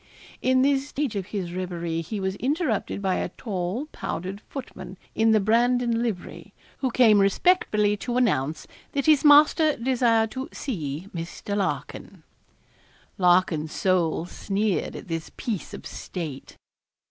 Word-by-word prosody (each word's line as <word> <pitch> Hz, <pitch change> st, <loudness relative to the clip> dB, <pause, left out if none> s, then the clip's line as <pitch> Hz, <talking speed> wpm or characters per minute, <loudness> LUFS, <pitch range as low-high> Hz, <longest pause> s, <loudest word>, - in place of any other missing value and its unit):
In 255 Hz, 0 st, +3 dB
this 275 Hz, 0 st, +2 dB
stage 280 Hz, -6 st, -2 dB
of 190 Hz, -2 st, -3 dB
his 185 Hz, -5 st, -4 dB
reverie 170 Hz, -3 st, -3 dB
he 200 Hz, +6 st, -5 dB
was 190 Hz, 0 st, -1 dB
interrupted 265 Hz, -, -1 dB
by 190 Hz, -1 st, +1 dB
a -, -, -2 dB
tall, 195 Hz, +4 st, -3 dB
powdered 190 Hz, +4 st, -5 dB
footman, 250 Hz, -8 st, -8 dB, 0.2 s
in 225 Hz, 0 st, +3 dB
the 220 Hz, -1 st, +5 dB
Brandon 235 Hz, +2 st, +2 dB
livery, 220 Hz, -7 st, -5 dB, 0.2 s
who 265 Hz, -, 0 dB
came 230 Hz, -4 st, +5 dB
respectfully 210 Hz, -, +3 dB
to 245 Hz, +4 st, -3 dB
announce 155 Hz, -, +1 dB, 0.3 s
that 280 Hz, -1 st, -1 dB
his 305 Hz, -3 st, +5 dB
master 300 Hz, +1 st, +6 dB
desired 230 Hz, -3 st, +2 dB
to 260 Hz, +1 st, -5 dB
see 165 Hz, -, -4 dB
Mr. 175 Hz, +4 st, -5 dB
Larkin. 195 Hz, -2 st, -4 dB, 1.0 s
Larkin's 175 Hz, -4 st, +3 dB
soul 175 Hz, -3 st, +1 dB
sneered 200 Hz, +2 st, -2 dB
at -, -, -8 dB
this 165 Hz, -2 st, -4 dB
piece 215 Hz, -7 st, -4 dB
of -, -, -9 dB
state. 155 Hz, -7 st, -7 dB
210 Hz, 135 wpm, -25 LUFS, 180-250 Hz, 1.0 s, master